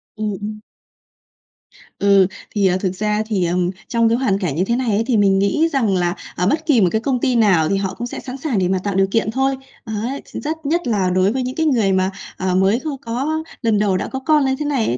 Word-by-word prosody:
Ừm, 215 -1 -2
ừm. 215 +1 -5 1.4
Ừ, 200 -2 +5 0.3
thì, 200 -2 +3
ờ, 185 0 +2
thực 185 -1 -2
ra 210 +2 0
thì, 200 -5 0
ờ, 170 +1 0 0.3
trong 230 -2 +2
cái 230 - +2
hoàn 205 -7 +1
cảnh 175 -8 -2
như 175 - +1
thế 235 - 0
này 250 -1 -1
ấy, 210 +1 +2
thì 245 -4 +2
mình 195 -2 +4
nghĩ 250 +12 +2
rằng 225 -8 +2
là, 175 0 0 0.2
ờ, 180 - 0
bất 310 +7 0
kỳ 280 -8 +4
một 185 - +5
cái 220 - 0
công 260 0 0
ty 255 -1 +1
nào 190 -9 +3
thì 195 - +1
họ 195 -1 -2
cũng 240 +5 -5
sẽ - - -6
sẵn 260 0 -7
sàng 270 -6 -1
để 180 - +1
mà 190 0 +1
tạo 200 -2 -2
điều 195 0 +3
kiện 225 -1 +1
thôi. 270 +3 +1 0.3
Đấy, 230 +5 -3
thì - - -7
rất 315 +1 -5
nhất 335 +2 0
là 200 -5 +1
đối 185 +2 +2
với 260 +2 -1
những 255 +1 -4
cái 320 - 0
người 230 -10 +2
mà, 190 0 +1 0.3
ờ, 185 -1 -1
mới 190 +5 +3
kho 310 - -5 0.2
có 280 +7 -2 0.2
lần 225 -4 +2
đầu 200 -3 +2
đã - - -3
có 265 - -4
con 295 +1 +2
như 265 0 +1
thế 300 - -2
này 275 -6 0
ấy, 120 - 0
215 Hz, 265 wpm, -19 LUFS, 195-260 Hz, 1.4 s, Ừ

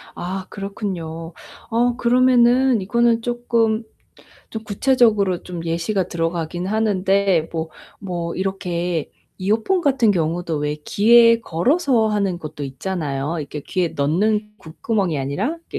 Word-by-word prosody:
아, 185 +1 -5
그렇군요. 175 -5 -5 0.4
어 240 +1 +1
그러면은 250 0 +4
이거는 235 +3 +2
쪼끔 235 -2 0 0.7
좀 220 - -6
구체적으로 210 -4 +2
좀 175 -2 -7
예시가 170 +3 -1
들어가긴 170 +1 -3
하는데, 195 -4 +1
뭐 160 -1 -3 0.3
뭐 175 -3 -4
이렇게 180 -4 -2 0.3
이어폰 220 - +1
같은 265 -7 +3
경우도 170 -1 -1
왜 150 0 -2
귀에 230 +2 +5
걸어서 240 - +1
하는 200 -4 0
것도 155 -3 -7
있잖아요. 145 +1 -3
이렇게 150 0 -6
귀에 180 +3 -1
넣는 210 +10 0
귓구멍 190 +4 -2
이 150 - -1
아니라 185 - -2
그 - - -3
195 Hz, 280 characters per minute, -21 LUFS, 165-230 Hz, 0.7 s, 귀에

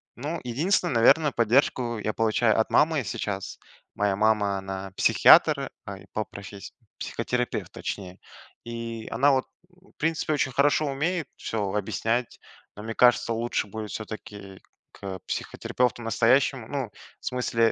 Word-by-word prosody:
Ну 150 +7 -4
единственно, 160 +8 +1
наверно, 140 +6 +5
поддержку 120 0 +2
я 110 0 -2
получаю 110 0 +2
от 110 - +1
мамы 155 -2 +3
сейчас. 100 -3 -4 0.4
Моя 100 -1 +1
мама 105 -1 +2
она- 95 0 -6
психиатр, - - +5 0.2
э, - - -8
по 110 - -1
професс 100 -1 -10 0.3
психотерапевт, 125 0 -3
точнее. 95 -2 -6 0.5
И 115 -1 -6
она, 140 +5 +4
вот, 130 -1 +1 0.2
в 180 +1 -25
принципе 160 0 0
очень 145 -2 0
хорошо 145 +3 +3
умеет 150 +3 -1
все 115 - -5 0.2
объяснять, 115 +3 -1 0.4
но 105 - -8
мне 115 +1 -4
кажется 120 -1 +4
лучше 115 -1 -1
будет 110 +1 -6
все-таки, 105 -3 -8 0.3
к 95 -1 -7
психотерапевту 125 -1 -1
настоящему. 115 +2 +2
Ну 135 -6 -3 0.3
в - - -17
смысле 115 -2 +1
115 Hz, 135 wpm, -26 LUFS, 105-135 Hz, 0.5 s, наверно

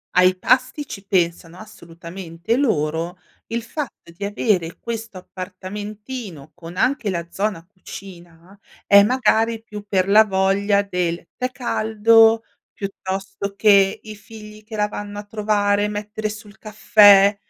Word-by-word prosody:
Ai 185 0 +5
pasti 260 +7 +1
ci 195 -7 -9
pensano 170 -2 -1
assolutamente 170 -1 -6
loro, 170 - -1 0.3
il 230 0 -3
fatto 265 - -7
di 200 - -8
avere 190 -5 -1
questo 225 -3 -6
appartamentino 195 - -8
con 175 0 -11
anche 255 -3 +1
la 170 -3 -3
zona 195 -4 -3
cucina 180 -1 -13 0.3
è 200 0 +7
magari 225 0 +1
più 210 -2 -9
per 190 -2 +1
la 210 +2 +7
voglia 200 0 +1
del 175 -3 -3
tè 255 0 -2
caldo, 225 -2 +3 0.3
piuttosto 195 0 -5
che 200 -1 +4
i 215 -1 -9
figli 215 0 -13
che 220 +1 -9
la 210 -1 +1
vanno 205 0 -7
a 205 - -5
trovare 205 -1 0
e - - 0
mettere 210 +1 -4
su 215 +1 -9
l 205 - -17
caffè. 205 -2 +5
205 Hz, 135 wpm, -21 LUFS, 185-215 Hz, 0.3 s, è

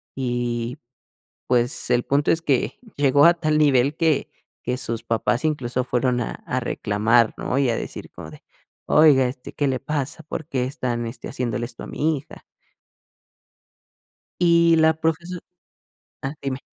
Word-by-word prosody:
y, 120 -2 -2 0.7
pues, 125 +1 +1
el 120 0 +3
punto 145 +1 +2
es 165 - +1
que 140 -6 0 0.2
llegó 145 0 +5
a 170 +1 +7
tal 155 -2 0
nivel, 140 0 +3
que 160 -4 +1 0.3
que 125 +1 -1
sus 115 -2 -3
papás 120 +4 0
incluso 125 -4 -1
fueron 125 0 0
a - - -3
a 130 - -1
reclamar, 110 +1 +2
¿no? 130 - -2
Y 135 -3 +2
a 115 - +1
decir - - -7
como - - -10
de: - - -14 0.4
"Oiga, 150 -4 +6
este, 125 0 -8
¿qué 145 - 0
le 130 -2 0
pasa?, 150 +1 -3
¿por 155 0 -6
qué 130 -5 -1
están, 120 -3 -3
este, 115 +1 -8
haciéndole 120 -1 -2
esto 120 -1 -9
a - - -7
mi 155 0 0
hija? 135 - -12 2.0
Y 170 -1 +5
la 160 0 +5
profeso 165 +3 -2 0.9
ah, 135 +1 -3
dime. 135 0 -3
130 Hz, 160 wpm, -23 LUFS, 120-150 Hz, 2.0 s, a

